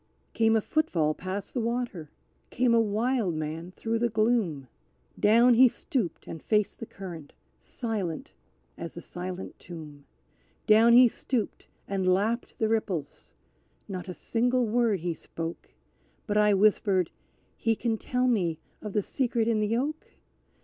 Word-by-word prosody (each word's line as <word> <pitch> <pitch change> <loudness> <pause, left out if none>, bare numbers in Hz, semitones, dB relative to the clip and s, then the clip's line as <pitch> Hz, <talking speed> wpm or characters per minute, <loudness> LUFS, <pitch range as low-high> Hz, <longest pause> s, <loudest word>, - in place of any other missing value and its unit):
Came 225 0 +3
a 220 - +3
footfall 175 - +1
past 185 +4 -5
the 255 - -1
water 230 -9 -3 0.4
came 245 -1 +2
a 230 - +5
wild 220 -3 0
man 155 +3 -4
through 225 0 -1
the 240 0 +1
gloom, 215 - +1 0.5
Down 235 +4 +6
he 250 +2 +7
stooped 235 - -3
and 160 - -8
faced 210 -2 0
the 230 - -6
current, 170 -7 -9 0.3
silent 205 -9 -4 0.5
as 170 - -6
the 170 - -7
silent 180 +1 -7
tomb; 150 -4 -10 0.6
Down 225 +2 +6
he 245 +1 +9
stooped 235 -1 -3 0.2
and 190 -2 +1
lapped 215 +6 0
the 220 - +1
ripples: 190 -10 -3 0.5
not 185 -2 -6
a 180 - -5
single 245 +2 +1
word 225 -4 +1
he 175 0 -1
spoke, 165 +1 -7 0.6
But 210 - -2
I 210 -1 +5
whispered, 195 -3 +3 0.4
"He 225 0 +1
can 225 -1 -1
tell 250 0 0
me 180 -10 +1 0.2
of 210 -2 -6
the 210 - +1
Secret 235 -2 0
in 225 -2 +2
the 215 +2 +1
Oak? 300 +5 -3
215 Hz, 150 wpm, -28 LUFS, 180-235 Hz, 0.6 s, he